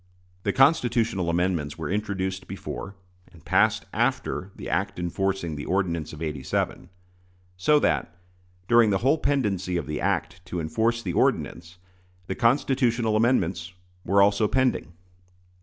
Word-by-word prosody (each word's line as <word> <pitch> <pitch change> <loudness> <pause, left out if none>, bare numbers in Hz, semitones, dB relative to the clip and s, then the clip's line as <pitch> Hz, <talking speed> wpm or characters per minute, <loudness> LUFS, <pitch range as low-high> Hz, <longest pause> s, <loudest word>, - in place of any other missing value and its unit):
The - - 0
constitutional 120 - +2
amendments 85 -4 0
were 80 -2 -4
introduced 95 -1 -2
before, 100 - -7 0.4
and 85 - -18
passed - - +2
after, 95 - -1
the - - -8
act - - -1
enforcing 90 -1 -2
the 75 - -6
ordinance 85 -5 -1
of 75 +1 -7
'87; 75 +3 -3 0.7
so 120 +12 +3
that, 90 - 0 0.5
during 120 -2 +5
the 100 - +2
whole 150 +4 +4
pendency 100 -10 0
of - - -3
the 75 0 -4
act 90 - -1
to 90 - -4
enforce 110 +9 0
the 90 - -3
ordinance, 85 +1 0 0.5
the - - -3
constitutional 120 -2 +2
amendments 95 -6 +1 0.3
were 100 +2 +4
also 105 +1 +3
pending. 130 -7 0
95 Hz, 135 wpm, -25 LUFS, 85-115 Hz, 0.7 s, during